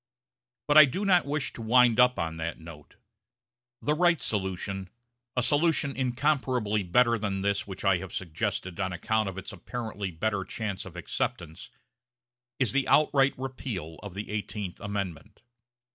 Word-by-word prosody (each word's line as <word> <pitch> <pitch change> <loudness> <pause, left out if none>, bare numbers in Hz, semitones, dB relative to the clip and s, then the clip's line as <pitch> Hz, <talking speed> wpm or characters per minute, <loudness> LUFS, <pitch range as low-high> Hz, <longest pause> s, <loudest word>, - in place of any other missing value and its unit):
But 150 +1 +8
I 155 - +11
do 185 +10 -3
not 180 -6 +4
wish 145 0 -2
to - - -8
wind 120 +1 +4
up 125 0 +5
on 80 -1 -2
that 80 +1 -4
note. 80 -3 -12 0.9
The 150 - +2
right 170 0 +3
solution 95 -1 -3 0.5
a 125 - +3
solution 145 0 +2
incomparably 130 -4 0
better 115 +5 +3
than 100 -2 -2
this 100 +1 0
which 95 0 -7
I 95 -2 +4
have 95 0 -8
suggested 85 +1 -3
on 95 -2 -1
account 110 +4 0
of 95 - -8
its 95 - -6
apparently 110 -5 -5
better 100 +3 -1
chance 100 0 -4
of 90 -2 -10
acceptance 80 -1 -4 0.9
is 130 - +2
the 140 0 +1
outright 140 -2 +4
repeal 120 - -5
of 100 -3 -8
the 105 +1 -5
Eighteenth 105 -3 -4
Amendment. 100 -3 -5
105 Hz, 155 wpm, -28 LUFS, 95-130 Hz, 0.9 s, I